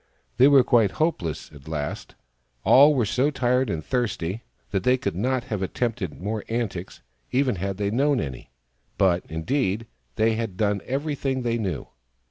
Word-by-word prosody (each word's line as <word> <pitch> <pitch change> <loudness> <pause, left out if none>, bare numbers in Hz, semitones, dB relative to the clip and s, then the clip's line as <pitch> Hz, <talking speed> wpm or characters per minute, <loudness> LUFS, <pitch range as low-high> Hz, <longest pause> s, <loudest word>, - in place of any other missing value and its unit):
They 130 - +7
were 140 -3 +7
quite 115 -5 +3
hopeless, 125 - -2
at 75 -1 -15
last. 75 -2 -4 0.5
All 145 +3 +7
were 120 -4 +2
so 130 +7 +1
tired 130 -3 +1
and 80 -5 -3
thirsty 110 -5 -2 0.3
that 95 - 0
they 125 +3 +4
could 130 - -3
not 125 +5 0
have 105 -3 -4
attempted 105 -3 -2
more 105 +3 -3
antics, 105 - -4 0.3
even 130 -5 +1
had 95 +1 -3
they 100 0 -1
known 140 +3 +2
any, 70 -4 -6 0.5
but, 90 -2 +3
indeed, 105 - -1 0.3
they 110 +1 +3
had 110 -4 -3
done 100 -2 +1
everything 135 -1 -2
they 120 -1 0
knew. 95 -9 -3
115 Hz, 160 wpm, -25 LUFS, 95-130 Hz, 0.5 s, They